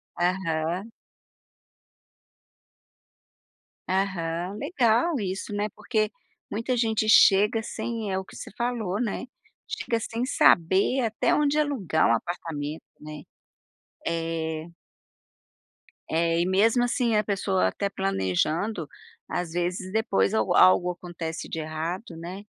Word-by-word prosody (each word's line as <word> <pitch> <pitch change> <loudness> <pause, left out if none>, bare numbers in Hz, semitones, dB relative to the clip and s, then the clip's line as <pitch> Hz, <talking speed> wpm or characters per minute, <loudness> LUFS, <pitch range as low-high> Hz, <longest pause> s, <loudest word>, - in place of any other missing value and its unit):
Aham. 175 +2 -1 3.0
Aham. 185 -1 -1
Legal 275 0 +2
isso, 195 +1 -4
né. 205 +1 -1
Porque, 215 0 0 0.4
muita 230 +4 -1
gente 220 -2 +1
chega 210 +1 +6
sem 225 -3 -4
é 190 - 0
o 190 - -7
que - - -14
você - - -8
falou, 230 -5 -1
né. 230 +1 -2 0.4
Chega 340 - -2
sem 230 +2 -3
saber, 195 - +4
até 225 -2 +1
onde 295 0 +2
alugar 235 - +1
um 115 - +4
apartamento, 155 0 -5 0.2
né. 150 0 -9 0.9
É. 165 -1 -2 1.4
É, 165 +1 +2
mesmo 220 +6 +3
assim 240 -3 +1
a 210 - +2
pessoa 95 - +1
até 200 - -2
planejando, 145 - -1 0.4
às 175 -2 -3
vezes 180 +2 -2
depois 150 - +1
alg 110 -1 +1
algo 180 -1 +6
acontece 170 -2 -6
de 160 - -4
errado, 165 +4 -4
né. 180 +5 -7
190 Hz, 110 wpm, -26 LUFS, 165-220 Hz, 3.0 s, chega